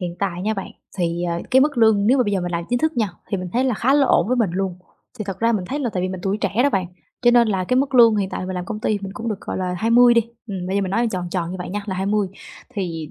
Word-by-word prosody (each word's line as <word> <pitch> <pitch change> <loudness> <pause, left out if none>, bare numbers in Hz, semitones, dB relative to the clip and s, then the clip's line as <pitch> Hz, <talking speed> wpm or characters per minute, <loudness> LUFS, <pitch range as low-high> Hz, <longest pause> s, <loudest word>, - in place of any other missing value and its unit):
Hiện 175 -1 -4
tại 180 -2 -2
nha 215 +2 0
bạn, 195 -2 -6 0.3
thì, 170 -1 -1
à, 170 -1 -1
cái 260 - +6
mức 285 -2 +2
lương 220 -3 +4
nếu 260 +5 +4
mà 250 - +3
bây 205 - -1
giờ 195 - +1
mình 175 0 -4
làm 170 0 -2
chính 245 - +2
thức 315 0 0
nha, 220 -3 +1 0.2
thì 200 - 0
mình 185 -1 -5
thấy 250 +3 +1
là 255 -3 +1
khá 255 +6 +2
là 285 -2 +4
ổn 220 - +3
với 255 - +1
mình 225 -7 +1
luôn. 190 0 -2 0.4
Thì 215 - -3
thật 195 -1 -5
ra 230 +2 +2
mình 205 -5 -1
thấy 285 - -2
là 250 -5 -1
tại 185 - -1
vì 185 - -1
mình 185 -1 -5
tuổi 195 +2 -1
trẻ - - 0
đó 285 - +3
bạn, 190 -6 0 0.4
cho 240 - +6
nên 240 -1 +5
là 190 -3 0
cái 250 - +1
mức 270 +1 +1
lương 230 -3 +7
hiện 195 -2 0
tại - - -4
là 185 - -4
mình 185 - -4
làm 180 -1 -3
công 215 +2 -5
ty 215 -1 0
mình 195 -1 -6
cũng 230 +3 -5
được, 210 -3 -3
gọi - - -5
là, 180 -1 -2
20 240 +2 +5
đi, 235 - +5 0.3
ừm, 190 -4 -5
bây 190 +2 -1
giờ 200 - +1
mình 190 - -3
nói 230 +4 +1
tròn 180 -3 -4
tròn 170 -2 -2
như 185 - -5
vậy 180 - -5
nha 205 +2 -3
là 190 - -3
20. 200 +1 0 0.5
Thì 165 -6 -4
200 Hz, 340 wpm, -21 LUFS, 185-235 Hz, 0.5 s, lương